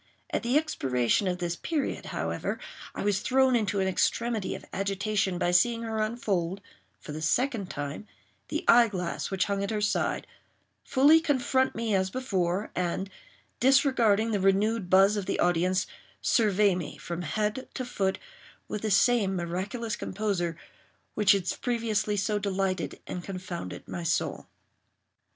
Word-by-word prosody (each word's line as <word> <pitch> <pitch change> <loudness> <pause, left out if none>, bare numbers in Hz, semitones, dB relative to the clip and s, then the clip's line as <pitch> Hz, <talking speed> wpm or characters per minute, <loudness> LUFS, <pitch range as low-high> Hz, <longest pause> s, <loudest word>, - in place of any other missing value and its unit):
At - - 0
the 245 +4 +2
expiration 135 - +1
of 180 -1 0
this 175 -1 -2
period, 305 - -3
however, - - -3 0.4
I - - -3
was 200 -1 +1
thrown 260 +2 +3
into 205 -3 0
an 190 - +1
extremity 225 +2 0
of - - -10
agitation 195 -1 -1
by 175 - +1
seeing 230 +6 +3
her 220 -1 -2
unfold, 200 -5 -1 0.4
for - - -9
the 155 +1 -5
second 225 - 0
time, 145 +8 -5 0.4
the - - -3
eye 235 0 +7
glass 180 -5 -3
which 190 -2 0
hung 200 -1 -1
at 200 - -2
her 215 -1 -1
side, 210 - 0 0.6
fully 285 +4 +5
confront 265 -4 +1
me 225 -1 -1
as 190 -1 +2
before, 195 -5 -1
and, 180 +2 -2 0.5
disregarding 245 -5 +4
the 205 - +1
renewed 195 +1 +2
buzz 195 +3 +5
of 195 -3 -3
the - - 0
audience, 180 +2 +2 0.3
survey 210 -3 +3
me, 175 -5 -5
from 170 0 -5
head 210 - -2
to 255 - -3
foot, 195 -5 -1 0.5
with 210 - -4
the 220 - -1
same 205 -1 +3
miraculous 190 +6 -3
composure 190 -7 -2 0.6
which 210 -2 +5
had 195 -2 -1
previously 220 -4 0
so 205 +1 0
delighted 195 -2 -2
and 180 - -5
confounded 185 -2 -6
my 175 - -5
soul. 165 - -1
200 Hz, 150 wpm, -28 LUFS, 185-230 Hz, 0.6 s, eye